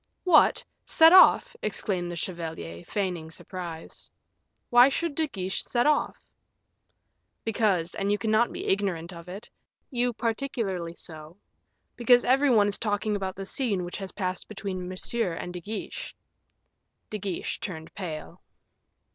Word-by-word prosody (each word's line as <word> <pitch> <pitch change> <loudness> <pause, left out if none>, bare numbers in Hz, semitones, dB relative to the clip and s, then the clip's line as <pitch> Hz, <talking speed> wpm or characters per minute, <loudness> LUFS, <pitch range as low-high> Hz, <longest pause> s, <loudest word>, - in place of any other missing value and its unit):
"What! 350 -4 +5 0.2
set 325 +1 +6
off!" - - +7
exclaimed 180 -4 -1
the - - -5
chevalier, 160 - -5
feigning 180 -6 -3
surprise; 170 -1 -8 0.6
"why 245 +2 +8
should 330 +3 -2
De 315 +2 0
Guiche 190 -8 -3
set 240 -1 0
off?" 300 0 +1 1.2
"Because, 200 -6 +1
and 200 +1 -1
you 205 - +2
cannot 220 +3 +2
be - - -5
ignorant 190 -3 -1
of 170 +1 -10
it 195 +4 -8 0.4
you 245 -1 +1
particularly 220 -8 -2
so 160 +1 -10 0.6
because 245 0 +5
every 270 +3 +4
one 215 -5 +5
is 205 - -2
talking 210 -1 0
about 190 -2 -3
the 195 - -6
scene 205 -5 -1
which 175 - -6
has 195 -2 -6
passed 185 -2 -3
between 195 -3 -5
Monsieur 185 +1 -2
and 175 +1 -6
De 180 - -6
Guiche." 220 - -6 1.0
De 215 - -3
Guiche 190 -3 -3
turned 160 -6 -6
pale. 165 -6 -7
195 Hz, 140 wpm, -27 LUFS, 175-235 Hz, 1.2 s, why